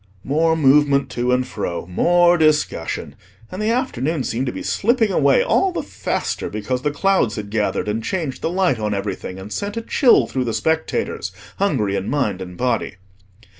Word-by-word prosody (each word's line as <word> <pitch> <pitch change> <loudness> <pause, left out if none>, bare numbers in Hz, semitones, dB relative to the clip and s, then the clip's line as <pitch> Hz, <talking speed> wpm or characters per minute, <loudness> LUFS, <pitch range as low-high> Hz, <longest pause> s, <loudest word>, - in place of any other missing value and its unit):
More 160 +4 +2
movement 140 -1 +4
to 125 +1 -1
and 125 0 +2
fro, 85 -8 -4
more 175 - +4
discussion; 155 - 0 0.4
and 185 - -5
the 215 - +1
afternoon 165 - -1
seemed 125 +3 -2
to - - 0
be - - -7
slipping 225 -1 +1
away 480 - +4
all 385 -6 +2
the - - -3
faster - - -3
because 115 +4 -3
the 145 - 0
clouds 145 - +1
had 105 -2 -6
gathered, 105 -1 -1
and 110 +2 -2
changed 160 -6 -3
the - - -1
light 180 -9 +1
on 105 -1 -1
everything, 100 -2 -4
and 95 +2 -8
sent 205 +2 -4
a - - -1
chill 250 +1 +4
through 130 -1 -2
the 115 - -2
spectators, 160 0 -1 0.3
hungry 120 - 0
in 100 - -2
mind 110 -10 -1
and 90 -1 -8
body. 125 -7 -1
135 Hz, 180 wpm, -20 LUFS, 110-175 Hz, 0.4 s, movement